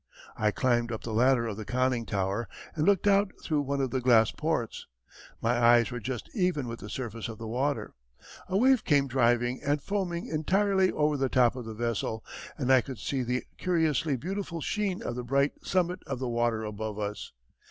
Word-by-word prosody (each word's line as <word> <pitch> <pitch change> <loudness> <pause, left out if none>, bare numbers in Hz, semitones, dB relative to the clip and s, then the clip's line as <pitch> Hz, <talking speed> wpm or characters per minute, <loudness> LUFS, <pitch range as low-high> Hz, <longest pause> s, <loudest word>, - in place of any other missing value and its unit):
I 105 - +2
climbed 120 +1 +1
up 110 - -5
the 115 - -4
ladder 125 +1 +3
of 110 -3 -4
the 110 - -5
conning 125 0 0
tower 100 +2 -1 0.3
and 155 0 0
looked 200 -2 +3
out 200 -1 +4
through 150 -2 +1
one 140 0 -2
of 135 -3 0
the 130 - -1
glass 115 -3 +5
ports. 150 -7 -2 0.6
My 115 - +3
eyes 120 -2 +5
were 120 - -4
just 120 +1 -5
even 180 - 0
with 115 0 -6
the - - -8
surface 115 -3 -5
of 110 - -7
the 115 - -7
water. 135 +6 -1 0.6
A 190 - +1
wave 255 +2 +4
came 140 -2 +3
driving 120 -1 +2
and 145 +1 +1
foaming 175 0 -2
entirely 190 +4 +2
over 150 -1 +1
the 135 -1 0
top 125 -1 +3
of 125 -3 -6
the 110 -1 -7
vessel, 110 -1 -2 0.3
and 130 -3 +2
I 130 - +6
could 130 -2 -8
see 135 +3 -2
the 125 +1 -1 0.2
curiously 160 -4 +1
beautiful 180 - -4
sheen 200 +3 -2
of 120 - -3
the 125 - -4
bright 140 +3 0
summit 180 0 0
of 135 - -3
the 130 -1 -3
water 120 -1 0
above 105 0 -5
us. 105 0 -4
130 Hz, 200 wpm, -29 LUFS, 115-155 Hz, 0.6 s, I